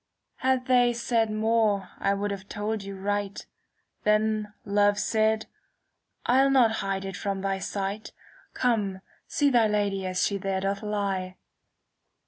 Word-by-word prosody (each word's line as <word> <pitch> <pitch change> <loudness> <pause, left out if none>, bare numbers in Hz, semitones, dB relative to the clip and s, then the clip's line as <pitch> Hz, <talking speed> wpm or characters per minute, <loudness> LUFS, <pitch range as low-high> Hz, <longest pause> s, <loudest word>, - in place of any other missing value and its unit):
Had 260 -1 +1
they 245 -1 +4
said 235 -1 +1
more 215 -3 +1
I 200 0 +1
would 205 +1 -2
have 200 0 -7
told 210 0 -2
you 195 0 -7
right; 200 +1 -3 0.6
Then 215 0 +1
Love 205 0 +3
said, 220 +1 +1 0.4
* - - -47
I'll 265 +3 +4
not 255 -4 +5
hide 195 0 -2
it 195 -1 -5
from 195 +1 -3
thy 195 0 -1
sight; 200 +2 -4 0.4
Come 205 -6 0 0.3
see 285 -1 +2
thy 235 -3 +4
Lady 200 -2 0
as 185 0 +1
she 200 -1 -1
there 190 0 -1
doth 200 +1 -1
lie.' 195 -3 -2
205 Hz, 145 wpm, -27 LUFS, 195-220 Hz, 0.6 s, not